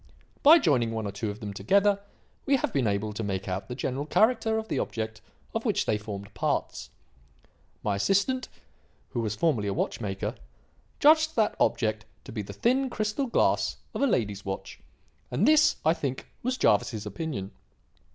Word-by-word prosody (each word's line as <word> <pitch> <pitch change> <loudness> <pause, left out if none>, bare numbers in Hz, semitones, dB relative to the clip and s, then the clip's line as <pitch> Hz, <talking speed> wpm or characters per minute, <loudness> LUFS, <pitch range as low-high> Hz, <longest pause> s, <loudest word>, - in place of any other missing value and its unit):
By 310 +3 +9
joining 135 - +2
one 110 -1 -3
or 100 - -3
two 105 +2 -3
of 105 +1 -7
them 105 -2 -5
together, 200 - +3 0.5
we 275 - +5
have 265 - -1
been 130 -5 +1
able 105 +1 -1
to 110 - -4
make 100 -2 -3
out 95 +1 -3
the 125 - -5
general 135 +3 -3
character 225 +3 +3
of 220 0 -3
the - - -1
object 110 -1 -4 0.3
of - - -2
which - - +1
they 105 - +1
formed 100 -1 -7
parts. - - -2 0.9
My 100 -2 0
assistant 200 - +1 0.6
who 120 - -3
was 110 -1 -2
formerly 120 -6 +1
a 100 - -1
watch - - -2
maker 95 -3 -3 0.7
judged 315 +1 +5
that 220 -2 +2
object 110 -2 +1 0.2
to - - -10
be 110 - -3
the 100 - -8
thin 260 +3 +1
crystal 215 +5 -1
glass 235 - +1 0.2
of - - -3
a 280 - +4
lady's 105 - 0
watch, 95 0 -6 0.5
and 125 - +1
this, 310 0 +5
I 160 - +5
think, 135 -5 -4 0.2
was 255 +1 -1
Jervis's 105 - +2
opinion. 105 - -4
120 Hz, 180 wpm, -27 LUFS, -, 0.9 s, By